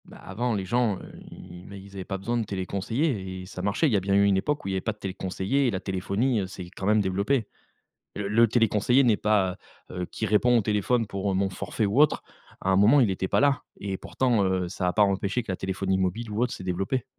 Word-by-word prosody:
Bah, - - -14
avant 115 +5 -3
les 95 -2 -3
gens, 115 -1 +1
heu, - - -11 0.2
ils 90 0 -11
ils, - - -14
bah, 100 - -9
ils 100 0 -12
avaient 95 -1 -6
pas 95 - -3
besoin 115 +5 -2
de 115 - 0
téléconseillers 100 - -2 0.3
et - - -7
et - - -10
ça 90 -1 -7
marchait. 100 - +1
Il 130 - 0
y - - +4
a - - +4
bien 100 +1 0
eu 100 - +5
une 100 -1 +3
époque 145 +7 -1
où - - -3
il - - -1
y - - -2
avait 95 - -1
pas 110 - -2
de - - -26
téléconseillers, 95 +6 -1
et - - +1
la 95 - -2
téléphonie, 100 +6 -1
heu, 95 - -3
s'est 90 -1 -9
quand 95 - -5
même 105 0 +4
développée. 100 +6 0 0.7
Le 100 -1 -3
le 115 +3 +5
téléconseiller 115 +3 +3
n'est 115 -4 +4
pas, 100 -4 +1 0.3
heu 90 - -4
heu, - - -3
qui 110 - -4
répond 115 +4 +3
au - - +3
téléphone 110 +3 +1
pour 100 0 -2
mon 95 +1 +1
forfait 105 +3 -2
ou 105 +8 +1
autre, 150 - +4 0.4
à 95 - 0
un 95 - +4
moment 110 +9 +6
il 115 -6 +3
était 95 0 -2
pas - - +2
là 140 -1 +2 0.2
et 100 -1 -3
pourtant, 120 -1 0
heu, 95 -1 0
ça 90 0 -2
a - - +1
pas 105 - +3
empêché 100 +3 +1
que 110 - -7
la - - -3
téléphonie 95 0 -1
mobile 95 +5 -2
ou 105 +2 -2
autre 125 - 0
s'est - - -7
développée. 95 +7 -1
100 Hz, 270 wpm, -26 LUFS, 95-115 Hz, 0.7 s, moment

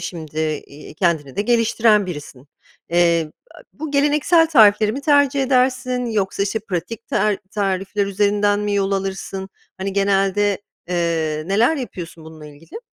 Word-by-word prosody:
şimdi, 155 -3 -6 0.3
iii, 145 +1 -13
kendini 155 -6 -1
de 205 - +1
geliştiren 225 -2 +3
birisin. 145 -5 -9 0.4
Eee, 170 -2 +2 0.2
a - - -13
bu 310 0 -7
geleneksel 295 +4 +3
tarifleri 215 -7 +5
mi 270 - -4
tercih 285 -1 +3
edersin, 255 -1 +1
yoksa, 200 -3 -1
işte, 200 +2 -1
pratik 210 +2 -5
tar 210 -2 +1
tarifler 195 0 -1
üzerinden 205 +1 +1
mi 205 -1 -1
yol 195 0 0
alırsın? 195 0 -4 0.3
Hani, 195 +1 -3
genelde, 200 0 +1 0.3
eee, 165 -3 -1
neler 225 - +2
yapıyorsun 175 - -7
bununla 160 -1 -12
ilgili? 150 - -12
200 Hz, 140 wpm, -20 LUFS, 175-230 Hz, 0.4 s, tarifleri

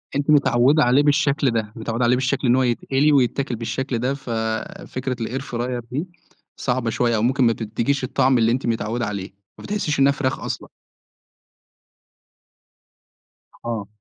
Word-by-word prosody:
أنتِ 140 +1 -1
متعوّدة 145 0 +4
عليه 125 +4 +4
بالشكل 145 -1 +2
ده، 110 -2 -2
متعوّدة 115 +1 -2
عليه 120 +1 +4
بالشكل 130 +1 0
إن 120 - +5
هو 130 - +3
يتقلي 135 +4 +1
ويتاكل 135 -1 +1
بالشكل 120 +3 -3
ده 130 +3 0
ف 135 -2 -9 0.6
فكرة 130 0 -3
الair 125 +4 -3
fryer 120 -1 -3
دي 150 +8 -2 0.5
صعبة 125 -2 -1
شوية 120 +1 +1
أو 105 - 0
ممكن 130 +3 +2
ما 115 -1 +4
تدّيكيش 115 +5 -2
الطعم 130 +1 +2
اللي 115 0 +3
أنتِ 130 +3 -1
متعوّدة 115 +1 -1
عليه، 100 -2 -5 0.3
ما - - -12
بتحسّيش 200 -8 -2
إنّها 135 +1 +5
فرخ 135 -2 -2
أصلًا. - - -5 3.0
آه. 115 -4 -3
125 Hz, 155 wpm, -22 LUFS, 115-140 Hz, 3.0 s, إن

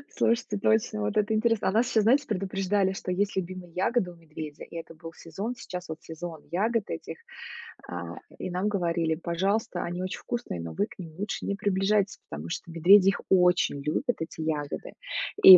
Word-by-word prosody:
Слушайте, 230 -3 +2
точно, 215 +1 +2
вот 210 +1 0
это 210 +1 +3
интересно! 225 0 +2
А - - +3
нас 225 +4 +2
щас, 220 -2 +4
знаете, 270 +6 +4
предупреждали, 195 -1 +1
что 185 - -4
есть 200 +2 +1
любимые 185 -1 -4
ягоды 190 0 +1
у - - -13
медведя, 155 -2 -8
и - - -11
это 165 0 -7
был 165 +1 -9
сезон. 195 +11 -4
Сейчас 180 -6 -7
вот 160 0 -5
сезон 160 -1 -7
ягод 215 +4 +1
этих, 80 - -5 0.7
а, 85 -1 -5 0.2
и - - -3
нам 180 +3 0
говорили: 170 -5 +1
"Пожалуйста, 175 +4 0
они 175 +1 -3
очень 185 - -3
вкусные, 240 - -3
но 85 -1 -5
вы - - +1
к - - -15
ним 165 -4 -8
лучше 205 +1 -3
не 200 - 0
приближайтесь, 195 0 +2
потому 75 +3 -6
что 170 - -4
медведи 185 +4 +7
их 195 - -1
очень 180 -6 +4
любят, 150 +2 -1
эти 160 0 -5
ягоды, 150 -2 -2 0.5
и 185 -1 +14
185 Hz, 190 wpm, -28 LUFS, 165-205 Hz, 0.7 s, и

